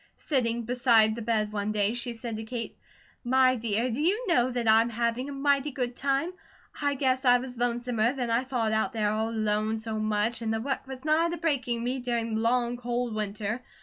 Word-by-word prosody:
Sitting 235 -5 0
beside 235 -2 +4
the 230 - -6
bed 215 -2 0
one 205 0 -1
day 210 0 +1
she 240 0 -3
said 230 -1 -5
to 220 - -5
Kate: 230 0 -5 0.5
"My 255 +1 +4
dear, 230 +1 0
do 245 +6 -2
you 410 +10 +1
know 255 -8 +3
that 240 -2 -2
I'm 225 +2 +5
having 235 +3 -1
a - - -5
mighty 280 +1 +1
good 250 -3 -3
time? 275 +7 0 0.5
I 285 -1 +1
guess 260 -1 +1
I 245 -1 +6
was 250 0 -7
lonesomer 240 -1 0
than 245 -4 -2
I 235 +2 +2
thought 245 -4 -1
out 220 0 0
there 210 -2 +1
all 220 +1 -1
alone 215 0 0
so 220 0 -3
much, 215 +2 0
and 225 -1 -1
the 225 - 0
work 270 +3 -3
was 265 +1 -8
nigh 315 +2 +3
to 345 - -3
breaking 260 -8 -1
me 255 +2 -1
during 235 -2 -2
the 220 - 0
long, 240 +1 +1
cold 240 -1 -2
winter. 215 +2 -3
240 Hz, 215 wpm, -28 LUFS, 220-260 Hz, 0.5 s, I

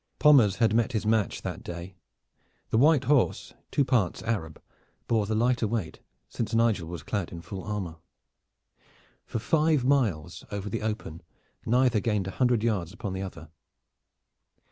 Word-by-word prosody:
Pommers 130 -10 +6
had 115 -2 +2
met 115 +2 +1
his 110 -1 -1
match 110 -3 +1
that - - -5
day. 85 +2 -7 0.8
The 110 - +3
white 150 0 +5
horse, 140 -1 +1 0.2
two 140 - +2
parts 115 -9 +1
Arab, 90 -9 -3 0.5
bore 110 -3 +1
the 110 - -1
lighter 120 0 +2
weight, 105 -6 -3 0.3
since 115 -1 -3
Nigel 115 -7 +2
was 85 -3 -7
clad 100 0 -3
in 85 -1 -8
full 95 -1 -7
armor. 95 -6 -4 1.3
For - - -3
five 155 +2 +2
miles 115 - 0
over 100 0 -4
the 115 - -2
open 105 -7 -4 0.5
neither 125 -1 +3
gained 105 -3 0
a 95 - -4
hundred 125 -3 +3
yards 100 -7 0
upon 100 -1 -5
the 95 - -4
other. 80 -5 -8
110 Hz, 155 wpm, -27 LUFS, 95-120 Hz, 1.3 s, Pommers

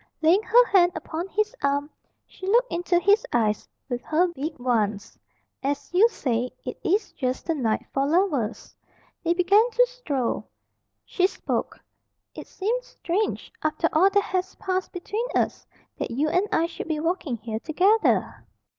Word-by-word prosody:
Laying 345 +6 +5
her 485 +3 +5
hand 360 -5 +4
upon 335 +3 -4
his 425 +2 -1
arm, 280 +1 +1 0.4
she 375 - -10
looked 480 +5 +3
into 350 +1 +1
his 405 +5 +4
eyes 215 -3 +1 0.2
with 245 -3 -3
her 345 +4 +2
big 310 -1 -5
ones. 220 -4 -1 0.5
"As 285 +3 -3
you 415 +6 +6
say, 245 - -1 0.2
it - - -5
is 400 +4 +1
just 255 -2 -3
the 330 - 0
night 235 -8 -1
for 275 0 +1
lovers." 295 - 0 0.5
They 340 0 +2
began 400 +6 +4
to - - +4
stroll. 310 - -3 0.6
She 370 0 +2
spoke - - -3 0.5
"It - - -9
seems 485 +6 -2
strange, 415 -3 -2
after 310 +1 +1
all 355 +5 +5
that 405 0 +2
has 370 0 -2
passed 370 -1 -2
between 420 +6 -3
us, - - 0 0.3
that - - -2
you 280 +7 0
and 360 +6 +1
I 325 - +2
should 335 0 -6
be 315 -2 -1
walking 325 -6 -1
here 220 0 -5
together." 380 - +1
345 Hz, 160 wpm, -25 LUFS, 280-395 Hz, 0.6 s, you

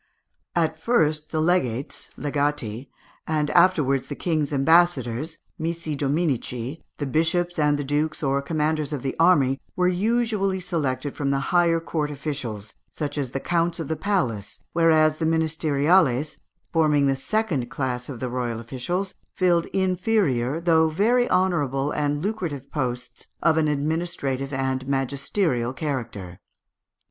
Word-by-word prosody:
At 160 -2 +1
first 155 -7 +1
the 155 - -1
legates 145 -7 0
(legati), 140 -5 -2 0.4
and 150 -1 0
afterwards 150 -7 +3
the 145 - -5
King's 155 -4 -1
ambassadors 155 -1 +2 0.2
(missi 165 -1 -2
dominici), 140 -2 -1 0.2
the 145 - -2
bishops 165 +4 +1
and 150 -1 +3
the 145 - -2
dukes 150 +3 -1
or 140 0 +1
commanders 155 0 -1
of 140 - -4
the 135 - -2
army 140 -6 +4
were 180 -1 +2
usually 200 0 +1
selected 150 -6 -2
from 140 -1 -1
the 140 0 +1
higher 170 -1 +4
court 160 -2 -2
officials, 130 -8 -5 0.2
such 145 -2 -4
as 140 -4 -2
the 135 - -3
counts 170 +3 0
of 160 - -4
the 160 - 0
palace, 150 - -2
whereas 155 -2 +4
the 160 - 0
ministeriales, 155 -2 +2 0.3
forming 150 -3 +3
the 135 -1 +2
second 150 - -1
class 125 -3 -3
of 130 -4 -6
the 130 - -2
royal 120 -2 -2
officials, 175 - -3 0.2
filled 175 -2 +2
inferior 185 - +1
though 160 -2 +3
very 235 +9 +2
honourable 145 -7 +1
and 145 0 -1
lucrative 170 - -3
posts 125 -4 -4 0.2
of 165 -1 +4
an 160 -1 +2
administrative 145 -2 -1
and 130 -1 -2
magisterial 135 - 0
character. 115 - -4
150 Hz, 135 wpm, -24 LUFS, 135-170 Hz, 0.4 s, army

